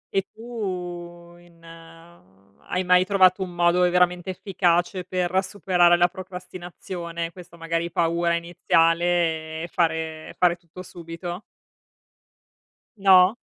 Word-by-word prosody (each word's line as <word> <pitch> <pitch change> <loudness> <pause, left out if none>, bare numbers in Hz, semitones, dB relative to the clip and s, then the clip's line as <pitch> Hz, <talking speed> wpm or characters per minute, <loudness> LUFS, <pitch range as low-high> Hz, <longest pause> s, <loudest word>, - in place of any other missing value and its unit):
E 195 - +4
tu 180 -6 -7
in 170 -1 -21
hai 165 - -9
mai 180 0 +4
trovato 185 -1 +3
un 185 - -3
modo 175 0 +2
veramente 180 0 +2
efficace 180 -1 0
per 185 +1 0
superare 180 -3 +3
la 175 0 +4
procrastinazione, 180 -2 -7
questa 170 -1 -14
magari 165 +1 -2
paura 170 +1 +1
iniziale, 165 -1 +1
e 170 - -6
fare 160 -2 -1
e - - -12
fare 180 -1 +3
tutto 170 +1 -12
subito? 175 +1 -8 1.6
No? 190 0 +6
175 Hz, 110 wpm, -24 LUFS, 170-180 Hz, 1.6 s, No